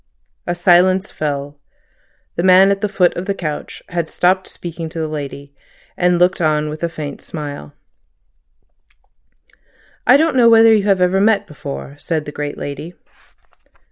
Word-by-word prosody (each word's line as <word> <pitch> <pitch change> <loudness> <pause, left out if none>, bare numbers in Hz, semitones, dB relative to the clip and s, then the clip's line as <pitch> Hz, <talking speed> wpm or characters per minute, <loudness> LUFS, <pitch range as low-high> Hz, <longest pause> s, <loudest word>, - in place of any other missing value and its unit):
A 175 - -1
silence 180 +2 +3
fell. 145 -1 -4 0.8
The - - -1
man 190 +2 +6
at 200 0 -1
the 210 - -1
foot 185 -3 +2
of 180 - -5
the 200 - -1
couch 155 -5 -6
had 170 -3 -2
stopped 185 +1 +1
speaking 165 -1 -7
to 165 - -6
the 160 - -2
lady, 140 -2 -7 0.4
and 180 0 +2
looked 180 +1 +2
on 155 -1 +1
with 155 +1 -7
a 170 - 0
faint 150 -3 -7
smile. 145 - -8 2.3
"I 255 - +7
don't 315 -1 +1
know 240 -2 +6
whether 225 0 +7
you 210 -2 +1
ever 190 -1 +2
met 215 0 +3
before," 70 - -8
said 155 -2 -3
the 150 - -6
great 145 0 -5
lady. 155 +5 -7
175 Hz, 155 wpm, -18 LUFS, 150-190 Hz, 2.3 s, I